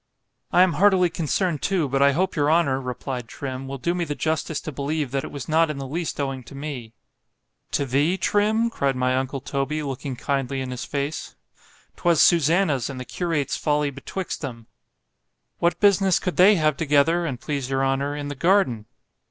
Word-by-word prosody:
—I 180 - +6
am 185 -2 +2
heartily 185 -3 +4
concerned 165 -1 -1
too, 185 -6 +1
but 135 +1 0
I 140 0 +5
hope 185 +6 0
your 145 0 +2
honour, 150 -5 +2
replied 125 -1 -5
Trim, 135 +1 -6
will 135 +1 -5
do 170 +6 -1
me 175 -1 -1
the 150 -3 -3
justice 160 0 -1
to 155 - -6
believe, 145 0 -2
that 135 -1 -1
it - - -6
was 140 -4 -7
not 160 +1 +3
in 150 - -4
the 135 - -5
least 160 +5 -4
owing 135 -2 -2
to 140 - -12
me.——To 135 0 -7
thee—Trim?—cried 190 - +1
my 130 0 +1
uncle 130 +1 -2
Toby, 140 +4 -2
looking 135 -1 -4
kindly 135 +1 -2
in 130 -1 -4
his 125 - -5
face——'twas 150 +3 -4
Susannah's 160 -5 +3
and 135 -2 -6
the 130 - -6
curate's 165 -4 -2
folly 150 -1 0
betwixt 170 +7 -5
them.——What 115 - -6
business 195 -3 +4
could 180 - -3
they 195 +4 +7
have 155 -4 +1
together, 165 +3 +2
an' 135 -5 -3
please 140 0 -4
your 135 0 +1
honour, 135 +2 0
in 145 -1 -4
the 145 - -4
garden? 145 - +2
145 Hz, 175 wpm, -24 LUFS, 135-170 Hz, -, they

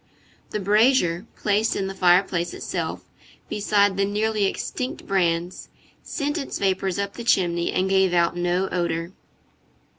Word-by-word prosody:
The 210 - -3
brazier, 210 -2 +2
placed 210 +2 +1
in 195 - -1
the 195 - -4
fireplace 180 -1 +2
itself, - - -4 0.4
beside 205 -1 +2
the 195 - +2
nearly 210 +1 0
extinct 255 +6 -4
brands, 175 -2 -1 0.3
sent 290 +2 -3
its 275 - -4
vapors 190 -1 0
up 200 0 -2
the 235 - -7
chimney, 175 -6 +1
and 185 - 0
gave 190 -1 +3
out 170 -1 +2
no 175 +2 0
odor. 170 -1 -2
195 Hz, 140 wpm, -23 LUFS, 175-210 Hz, 0.4 s, gave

